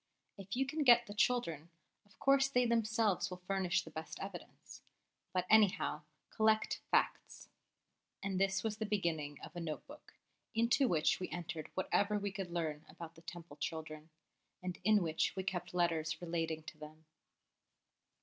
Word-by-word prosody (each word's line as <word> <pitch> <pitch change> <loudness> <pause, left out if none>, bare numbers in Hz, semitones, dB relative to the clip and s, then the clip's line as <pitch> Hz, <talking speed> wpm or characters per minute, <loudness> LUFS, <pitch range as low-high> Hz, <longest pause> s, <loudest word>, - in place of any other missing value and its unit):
"If 195 0 -6
you 265 +2 +2
can 305 +2 -1
get 240 -2 +7
the 205 - -8
children, 190 -9 +1 0.4
of 205 - -24
course 275 0 +4
they 250 -2 +2
themselves 225 -5 +2
will 180 0 -8
furnish 190 -2 +1
the 160 - -11
best 160 +1 -7
evidence; 195 -2 -9 0.5
but, 185 -1 0
anyhow, 205 -7 +4 0.3
collect 220 0 +2
facts." - - 0 0.7
And 195 -1 -1
this 195 0 +2
was 215 -1 -2
the 220 - -2
beginning 160 -8 -1
of - - -10
a - - -3
Note 160 -3 -4
book, 295 +1 -14 0.4
into 235 +4 +4
which 160 -8 +2
we 185 - -4
entered 165 -2 -5
whatever 205 +2 +1
we 200 -1 -2
could 195 -2 -5
learn 160 -3 -2
about 165 -1 -9
the 165 - -16
Temple 170 -3 -9
children, 155 0 -5 0.5
and 180 -1 -4
in 215 -3 +5
which 160 -1 0
we 190 - -2
kept 180 -1 -3
letters 165 -3 0
relating 165 -2 -2
to 155 -1 -10
them. 155 +1 -11
185 Hz, 160 wpm, -35 LUFS, 165-215 Hz, 0.7 s, get